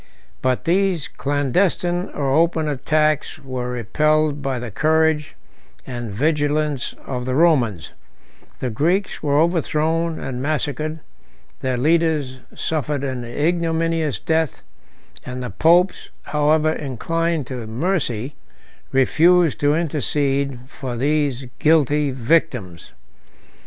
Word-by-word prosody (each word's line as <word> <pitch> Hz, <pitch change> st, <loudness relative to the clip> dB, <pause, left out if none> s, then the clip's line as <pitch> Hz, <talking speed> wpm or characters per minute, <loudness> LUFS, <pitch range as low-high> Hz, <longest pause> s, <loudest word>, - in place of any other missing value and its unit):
But 130 Hz, -1 st, 0 dB
these 180 Hz, -2 st, +1 dB
clandestine 170 Hz, +7 st, 0 dB
or 135 Hz, -2 st, 0 dB
open 160 Hz, 0 st, +2 dB
attacks 150 Hz, +2 st, 0 dB
were 130 Hz, -4 st, -5 dB
repelled 150 Hz, +5 st, +1 dB
by 135 Hz, -2 st, -2 dB
the 120 Hz, -2 st, -6 dB
courage 155 Hz, +3 st, +1 dB, 0.5 s
and 120 Hz, -3 st, -5 dB
vigilance 145 Hz, +3 st, 0 dB
of 125 Hz, -1 st, -4 dB
the 130 Hz, -, 0 dB
Romans; 130 Hz, -, +2 dB, 0.7 s
the 125 Hz, -, -1 dB
Greeks 175 Hz, -, 0 dB
were 145 Hz, -1 st, +2 dB
overthrown 165 Hz, 0 st, +1 dB
and 125 Hz, -1 st, -4 dB
massacred, 155 Hz, +1 st, -2 dB, 0.6 s
their 130 Hz, -1 st, -1 dB
leaders 150 Hz, -2 st, +1 dB, 0.2 s
suffered 150 Hz, -2 st, -2 dB
an 130 Hz, -3 st, -3 dB
ignominious 165 Hz, +2 st, 0 dB
death, 160 Hz, -2 st, -1 dB, 0.6 s
and 125 Hz, 0 st, -6 dB
the 125 Hz, -, -5 dB
popes, 175 Hz, -, +3 dB
however 150 Hz, +1 st, +2 dB
inclined 160 Hz, +3 st, -2 dB
to 120 Hz, -3 st, -6 dB
mercy, 130 Hz, -, -1 dB, 0.6 s
refused 160 Hz, +2 st, +4 dB
to 145 Hz, +1 st, +3 dB
intercede 140 Hz, -4 st, -1 dB
for 130 Hz, -3 st, -6 dB
these 140 Hz, -1 st, 0 dB
guilty 150 Hz, -2 st, +3 dB
victims. 125 Hz, -, -1 dB
150 Hz, 105 wpm, -21 LUFS, 130-160 Hz, 0.7 s, refused